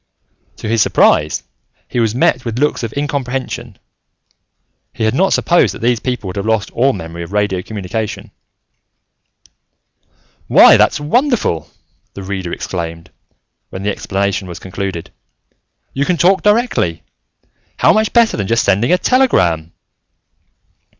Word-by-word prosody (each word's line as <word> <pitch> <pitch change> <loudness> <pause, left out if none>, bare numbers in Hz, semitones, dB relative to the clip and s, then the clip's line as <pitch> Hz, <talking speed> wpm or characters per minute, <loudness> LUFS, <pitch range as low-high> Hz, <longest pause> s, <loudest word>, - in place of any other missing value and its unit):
To - - -7
his 115 0 +1
surprise, 75 -6 +2 0.4
he 125 - -3
was 115 -1 +1
met 130 0 +2
with 115 -1 -4
looks 150 +3 0
of 115 -2 -4
incomprehension. 130 -5 -3 1.2
He - - -4
had 110 +1 +1
not 190 +8 +2
supposed 175 0 +2
that - - -10
these 120 -1 +2
people 125 -4 -3
would 90 - -6
have 100 - -3
lost 110 -3 0
all 135 +3 +2
memory 85 -5 -7
of 85 - -8
radio 105 -3 0
communication. 105 +2 -5 2.2
"Why, - - +7
that's - - +3
wonderful!" 185 - 0 0.5
the 100 - -7
Reader 95 -2 -4
exclaimed, 85 -2 -5 0.6
when 95 - -7
the 105 - 0
explanation 100 -1 -2
was 85 - -8
concluded. 95 -2 -6 0.8
"You 135 - 0
can 175 +4 0
talk 190 +4 +3
directly. 210 - +1 0.7
How - - +4
much 215 0 +1
better 235 -2 +3
than 100 -3 -2
just 115 +2 +1
sending 100 - +2
a 180 - +5
telegram!" 90 - +1
110 Hz, 135 wpm, -16 LUFS, 95-140 Hz, 2.2 s, Why